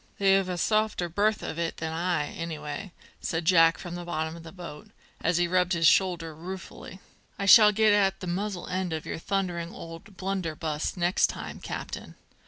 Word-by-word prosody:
"They've 195 -1 +3
a 180 - -2
softer 215 -2 +1
berth 210 +5 +1
of 160 - -4
it 165 -1 -2
than 160 0 -3
I, 165 -3 0
anyway," 160 +2 -5 0.3
said 165 0 -2
Jack 165 -1 +5
from 175 -2 -7
the 175 0 -5
bottom 160 -2 -3
of 170 - -10
the 165 0 -10
boat, 170 -5 -10 0.3
as 165 +1 +2
he 175 0 +2
rubbed 180 +1 +2
his 170 -1 +1
shoulder 175 -2 +3
ruefully. 185 +3 -9 0.4
"I 195 - -2
shall 210 +1 +9
get 215 0 +4
at 195 -2 +2
the - - -6
muzzle 185 +1 -3
end 185 -2 -2
of 155 - -4
your - - -4
thundering 175 -2 -2
old 165 +4 -10
blunderbuss 165 -5 -3
next 175 +1 +3
time, - - -7
captain. - - -6
175 Hz, 185 wpm, -27 LUFS, 165-195 Hz, 0.4 s, shall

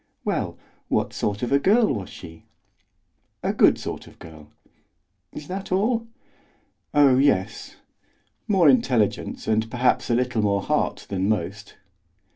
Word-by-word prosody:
"Well, - - -2 0.3
what - - -1
sort 105 +2 -2
of 120 - -2
a 140 - +4
girl 210 - +3
was 100 -6 -5
she?" 80 0 -12 1.0
"A - - 0
good - - +4
sort - - -6
of - - -17
girl." 80 -2 -13 0.8
"Is 150 - -9
that 190 +1 -6
all?" 225 +5 +1 0.8
"Oh, 140 -3 +5
yes; 105 -10 0 0.7
more 190 -6 +4
intelligence 125 -5 +1
and 110 0 +1
perhaps 125 +2 +1
a 120 - +3
little 125 -2 0
more 100 -1 +1
heart - - -1
than 95 0 -1
most." 100 0 -3
120 Hz, 135 wpm, -24 LUFS, 100-145 Hz, 1.0 s, Oh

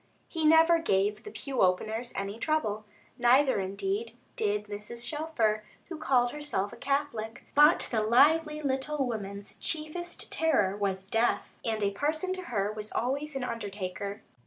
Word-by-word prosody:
He 320 -2 -2
never 325 +2 +6
gave 205 -8 +1
the - - -6
pew 275 - -3
openers 220 +6 +1
any 200 +3 -4
trouble, 220 -8 -1 0.3
neither 255 0 +4
indeed 200 +4 -3 0.2
did 210 0 0
Mrs. 210 +3 -4
Shelfer, 295 -9 0 0.3
who 335 -3 -6
called 250 -5 +2
herself 295 -10 -3
a - - -8
Catholic; 275 -6 -2
but 295 +4 +6
the 225 -3 +1
lively 300 +7 +4
little 275 +1 0
woman's 200 -4 -5
chiefest 335 +2 -4
terror 265 -12 +2
was 195 -2 -1
death, 225 +4 0
and 220 -2 -1
a 200 - +2
parson 310 - -1
to 370 -1 -6
her 200 -8 -1
was 215 0 -6
always 280 +4 -2
an 270 - -2
undertaker. 200 -3 -5
235 Hz, 150 wpm, -29 LUFS, 205-300 Hz, 0.3 s, never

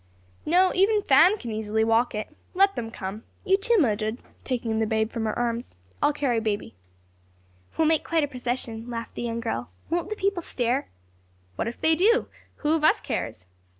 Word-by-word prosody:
"No; 365 +3 +4
even 415 +2 +3
Fan 325 +9 +6
can 235 - -6
easily 220 0 0
walk 225 +1 +2
it. 215 - -5 0.2
Let 390 +1 +4
them 225 -1 -4
come. 210 0 -6 0.2
You, 385 -1 +5
too, 460 +4 +2
Mildred," 220 - +1 0.2
taking 230 -4 -1
the 220 - +1
babe 220 0 0
from 230 -2 -3
her 215 - -2
arms. 235 - -2 0.3
"I'll - - +4
carry 275 -5 0
baby." 215 -2 -2 1.0
"We'll 320 - +3
make 320 -1 +2
quite 330 -2 +1
a - - +1
procession," 245 -3 -4
laughed 230 -1 -5
the - - -6
young 235 -1 -2
girl. 115 - -3 0.2
"Won't 345 +2 0
the 430 - -2
people 395 -3 0
stare?" 250 -3 -1 0.7
"What - - -2
if 230 - -5
they 320 - +3
do? 450 +8 +3 0.4
who 305 - +4
of 320 -2 0
us - - +5
cares?" 100 -5 -4
245 Hz, 185 wpm, -26 LUFS, 225-330 Hz, 1.0 s, Fan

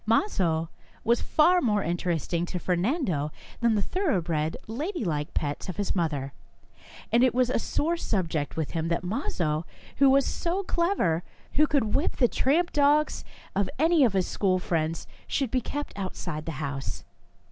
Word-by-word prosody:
Mazo 180 - +1 0.3
was 235 +1 +2
far 355 +4 +4
more 210 -4 +2
interesting 170 0 -1
to 180 - -3
Fernando 180 - 0 0.3
than 235 -2 +3
the 205 - +1
thoroughbred, 175 - 0
ladylike 220 - -3
pets 145 +5 -2
of 185 - -5
his 205 -1 -1
mother, 145 -6 -1 0.8
and 240 +1 +5
it 250 -2 +3
was 250 -1 +3
a - - +1
sore 330 +8 0
subject 165 - -2
with 160 -3 -2
him 165 0 -1
that 170 +1 -1
Mazo, 175 - -1 0.3
who 275 -1 +6
was 275 0 +5
so 360 +3 -1
clever, 340 - +1 0.3
who 305 +2 +4
could 270 -9 +1
whip 290 - +1
the 245 - +4
tramp 325 +9 +1
dogs 295 +1 +3 0.3
of 195 -1 +1
any 320 +1 +4
of 235 -6 +3
his 190 -2 +2
school 185 -2 +1
friends, 165 -2 -1 0.2
should 270 -5 -1
be 255 - +1
kept 290 +5 -4
outside 175 -5 -5
the 165 - -2
house. 140 -1 -4
200 Hz, 160 wpm, -27 LUFS, -, 0.8 s, who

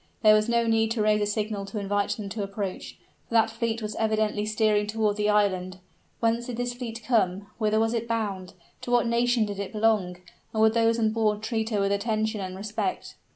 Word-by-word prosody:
There 215 -1 +8
was 215 +1 +3
no 235 0 +2
need 225 -1 +2
to 225 - -1
raise 210 0 +3
a 205 - +1
signal 210 -1 -2
to 195 +2 -5
invite 200 0 0
them 210 -2 -5
to 210 +2 -4
approach 195 -1 -5 0.3
for 235 - -3
that 225 -1 +4
fleet 225 0 -2
was 210 0 -4
evidently 215 -1 0
steering 215 -1 +2
toward 210 -1 0
the 210 0 0
island. 185 -3 +1 0.4
Whence 230 +1 0
did 245 -2 -5
this 245 0 -2
fleet 235 -2 -7
come? 200 -5 +1
whither 215 -1 +2
was 225 +1 +1
it 230 0 -2
bound? 205 -5 -3 0.3
to - - -7
what 245 -1 +3
nation 235 0 +2
did 205 -1 -5
it 200 - -4
belong? 210 -5 +1 0.4
and 220 - 0
would 220 0 +5
those 230 0 +3
on 220 -2 +2
board 215 -1 0
treat 220 -1 -1
her 210 -3 0
with 195 0 +1
attention 215 +1 -1
and 185 -1 -5
respect? 215 - -3
215 Hz, 215 wpm, -26 LUFS, 205-225 Hz, 0.4 s, There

